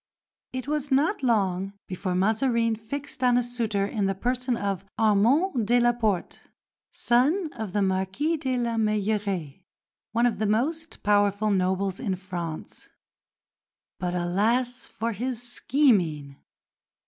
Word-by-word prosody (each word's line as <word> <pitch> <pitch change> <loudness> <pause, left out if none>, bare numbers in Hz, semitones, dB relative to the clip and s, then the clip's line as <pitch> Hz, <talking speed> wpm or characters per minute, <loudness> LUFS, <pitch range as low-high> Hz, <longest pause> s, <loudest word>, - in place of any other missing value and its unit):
It 255 0 -5
was 295 -1 -1
not 295 +9 +2
long 195 -6 +1
before 185 0 -3
Mazarin 230 +4 +2
fixed 265 +4 -6
on 245 -1 +4
a 245 - +2
suitor 230 -5 -1
in 200 -1 -1
the 195 - -1
person 250 +3 -1
of 195 -2 -2
Armande 230 - +3
de 245 +2 +4
la 240 0 +4
Porte, 215 -6 -1 0.5
son 295 +8 +2
of 220 -4 -5
the 205 -1 +2
Marquis 190 - 0
de 260 -3 -1
la 235 -1 -1
Meilleraye, 205 -7 -1 0.5
one 235 +2 +2
of 240 - +1
the 215 - +1
most 310 +10 -1
powerful 205 0 +2
nobles 190 0 0
in 195 -6 -1
France. 175 -4 -7 1.1
But 180 -1 -2
alas 230 +8 0
for 230 +2 -3
his 245 +2 -4
scheming! 200 - +1
220 Hz, 135 wpm, -26 LUFS, 195-250 Hz, 1.1 s, on